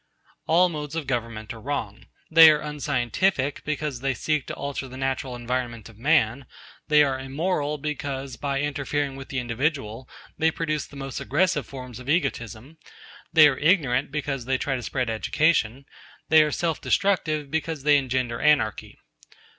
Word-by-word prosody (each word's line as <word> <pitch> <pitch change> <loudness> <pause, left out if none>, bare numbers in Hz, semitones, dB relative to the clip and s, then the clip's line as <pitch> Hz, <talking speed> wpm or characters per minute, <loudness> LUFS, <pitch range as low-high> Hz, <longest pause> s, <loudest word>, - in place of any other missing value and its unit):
All 175 +3 +5
modes 150 -3 -5
of 165 -3 -3
government 115 -3 -3
are 115 - -11
wrong. 115 -7 -4 0.2
They 160 0 +10
are 150 -1 +4
unscientific, 145 +1 -1
because 150 -3 -3
they 135 +1 -1
seek 150 +3 -1
to - - -4
alter 140 -1 -4
the 130 0 -10
natural 135 -1 -2
environment 120 -2 -4
of 110 - -16
man; 130 -2 +2 0.4
they 150 -1 +6
are 135 -2 0
immoral 150 +2 -2
because, 140 -3 -4
by 140 +1 -2
interfering 145 -1 -2
with 135 0 -9
the 135 - -4
individual, 125 -1 -2 0.3
they 160 - +4
produce 155 -2 -2
the - - -15
most 135 -1 -5
aggressive 155 0 +1
forms 125 -3 -9
of 125 +2 -9
egotism; 135 - -2 0.5
they 155 -2 +8
are 135 -3 0
ignorant, 150 -7 +2
because 140 -4 -3
they 130 +1 +1
try 135 +1 -1
to 125 - -4
spread 125 +1 -2
education; 135 +2 +1 0.4
they 160 0 +7
are 150 - +2
self 165 -1 -1
destructive, 155 -8 0
because 160 -2 -2
they 145 0 +5
engender 125 -3 -2
anarchy. 145 -9 +1
140 Hz, 160 wpm, -25 LUFS, 125-150 Hz, 0.5 s, They